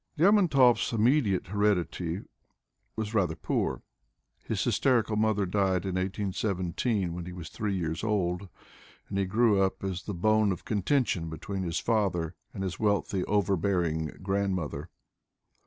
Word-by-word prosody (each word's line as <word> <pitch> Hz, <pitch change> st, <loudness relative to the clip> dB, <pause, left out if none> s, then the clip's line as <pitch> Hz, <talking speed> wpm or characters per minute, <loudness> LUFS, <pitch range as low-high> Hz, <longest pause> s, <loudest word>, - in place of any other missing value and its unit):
Lermontov's 155 Hz, -, +4 dB
immediate 115 Hz, -3 st, +2 dB
heredity 95 Hz, -3 st, 0 dB, 0.7 s
was 110 Hz, 0 st, -3 dB
rather 90 Hz, -7 st, +1 dB
poor. -, -, -2 dB, 0.6 s
His -, -, -1 dB
hys -, -, +1 dB
terical 115 Hz, -5 st, +2 dB
mother 105 Hz, -2 st, +2 dB
died 95 Hz, -1 st, +1 dB
in 95 Hz, -, -2 dB
18x7, 95 Hz, +1 st, -1 dB
when 85 Hz, 0 st, -6 dB
he -, -, -6 dB
was 85 Hz, -3 st, -8 dB
three 105 Hz, +1 st, -2 dB
years 80 Hz, -1 st, -3 dB
old, 95 Hz, -3 st, -1 dB, 0.6 s
and 100 Hz, -, -2 dB
he 100 Hz, -, +2 dB
grew 105 Hz, +1 st, +3 dB
up 95 Hz, 0 st, 0 dB
as 95 Hz, -2 st, -2 dB
the 100 Hz, -, -4 dB
bone 110 Hz, +3 st, +3 dB
of 90 Hz, -, -5 dB
contention 105 Hz, -, 0 dB
between 95 Hz, +5 st, -5 dB
his 85 Hz, -2 st, -1 dB
father 95 Hz, -8 st, 0 dB, 0.2 s
and 95 Hz, -, -5 dB
his 95 Hz, -2 st, -4 dB
wealthy, 100 Hz, -2 st, +1 dB
overbearing 90 Hz, -5 st, +1 dB, 0.2 s
grandmother. 95 Hz, -5 st, -1 dB
95 Hz, 140 wpm, -29 LUFS, 90-105 Hz, 0.7 s, Lermontov's